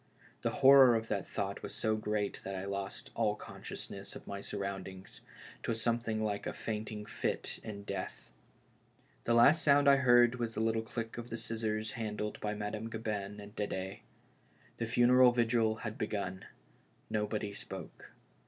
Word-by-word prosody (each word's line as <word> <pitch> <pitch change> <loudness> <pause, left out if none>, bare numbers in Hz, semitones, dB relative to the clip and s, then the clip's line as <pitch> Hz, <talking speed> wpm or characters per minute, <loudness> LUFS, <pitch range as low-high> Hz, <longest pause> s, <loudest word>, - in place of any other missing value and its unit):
The - - +1 0.2
horror 135 -3 +9
of 115 0 -2
that 100 -3 -1
thought 100 0 -3
was - - -6
so 110 0 +1
great 105 -1 -1
that 95 - -4
I 95 +1 -4
lost 100 0 -4
all 110 -2 +1
conscious - - -8
ness - - -7
of - - -10
my 100 0 -5
surroundings 95 -1 -6 0.2
— - - -16
'twas 115 -1 -1
something 115 -1 0
like 105 -1 -2
a - - -2
faint 110 -1 -4
ing 105 -1 -6
fit - - -3
in 100 -2 -7
death. 100 -2 -5 0.9
The 115 - +3
last 140 +7 +7
sound 145 -1 +5
I 140 0 +8
heard 120 -1 +5
was 115 -1 -2
the - - -2
little 110 0 +1
click 115 +1 -5
of 120 0 -7
the 115 - -4
scissors 110 -1 -2
handled 105 -2 -3
by 105 0 -2
Madame 105 +2 -4
Gabin 105 -2 -4
and 105 +1 -11
D^de. 95 -2 -3 0.8
The 115 - -2
funeral 125 +1 +6
vigil 115 -2 +2
had 110 -1 -4
begun; 95 -3 -3 0.6
nobody 105 -1 -1
spoke. - - -9
110 Hz, 170 wpm, -33 LUFS, 105-115 Hz, 0.9 s, horror